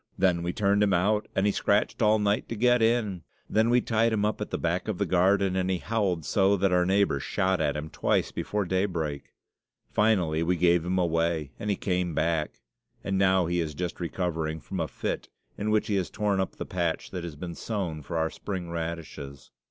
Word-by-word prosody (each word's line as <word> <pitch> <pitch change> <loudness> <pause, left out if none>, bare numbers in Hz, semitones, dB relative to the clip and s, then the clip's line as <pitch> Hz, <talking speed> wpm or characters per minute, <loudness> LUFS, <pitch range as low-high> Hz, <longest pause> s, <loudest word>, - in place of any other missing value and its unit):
Then 90 -3 +2
we 85 +1 -1
turned 100 +1 +2
him 100 -2 +3
out, 105 +4 +2
and 95 - +2
he 105 - +4
scratched 100 +4 +1
all 110 0 +5
night 105 0 0
to 115 - -3
get 120 +2 +3
in. 110 -5 +1 0.3
Then 110 +2 +2
we 120 +1 +4
tied 115 0 +2
him 105 -1 +1
up 105 - -1
at - - -3
the - - -2
back - - -1
of - - -2
the - - 0
garden, 95 +1 +3
and 95 0 0
he 95 - +1
howled 95 -6 -1
so 100 +6 +3
that 95 0 +2
our 90 0 +3
neighbour 95 -7 +2
shot 95 +4 0
at 75 -1 0
him 75 +1 -4
twice - - 0
before 105 -1 -2
daybreak. 85 -6 -1 0.7
Finally 90 -8 +2
we 90 +2 +1
gave 85 -1 +3
him 90 +2 -1
away, 85 -4 0
and 105 - -3
he 100 - +2
came 90 -4 -1
back; 80 -1 -1 0.4
and 100 - -1
now 95 -2 +4
he 85 +1 0
is 80 -3 -2
just 90 +1 -4
recovering 80 -3 -2
from 70 - -6
a - - 0
fit, - - -4 0.3
in 105 - -2
which 110 0 +2
he 100 - 0
has 95 - -1
torn 105 -2 0
up 95 - -2
the - - -5
patch 85 -3 -2
that 90 -2 -5
has 85 -3 -6
been 85 +3 -6
sown 90 -7 -3
for 85 +4 -4
our 80 0 0
spring 90 -4 -5
radishes. 80 -4 -6
90 Hz, 215 wpm, -27 LUFS, 85-100 Hz, 0.7 s, all